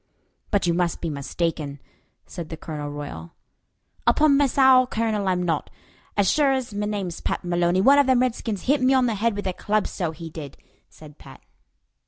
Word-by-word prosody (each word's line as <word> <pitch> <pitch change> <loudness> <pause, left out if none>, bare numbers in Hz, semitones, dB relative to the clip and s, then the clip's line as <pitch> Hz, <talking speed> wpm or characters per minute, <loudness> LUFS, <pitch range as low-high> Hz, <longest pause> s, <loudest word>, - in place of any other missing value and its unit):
"But 205 -3 +1
you 170 - +2
must 175 -1 0
be 165 - -3
mistaken," 145 0 -3 0.5
said 165 -3 -8
Colonel 150 -2 -6
Royal. 145 - -8 0.7
"Upon 300 -2 +4
me 285 0 +4
sowl, 260 -1 +5
Colonel, 220 -4 -1
I'm 180 -1 +1
not. 165 -4 -1 0.5
As 200 -2 +3
shure 290 -3 +3
ez 255 -4 -3
me 205 0 -2
name's 195 -5 -4
Pat - - -3
Maloney, 175 +1 +1
one 275 +7 +6
of 285 - +4
them 255 -2 +4
redskins 225 -5 -2
hit 280 +2 +2
me 260 +1 +4
on 260 -1 +3
the 235 - 0
head 215 +1 0
with 205 - -5
a 185 - -1
club, 210 +3 0
so 175 -3 -3
he 160 0 -8
did," 150 -4 -9 0.3
said 150 -1 -15
Pat. 135 -2 -14
190 Hz, 190 wpm, -24 LUFS, 165-245 Hz, 0.7 s, one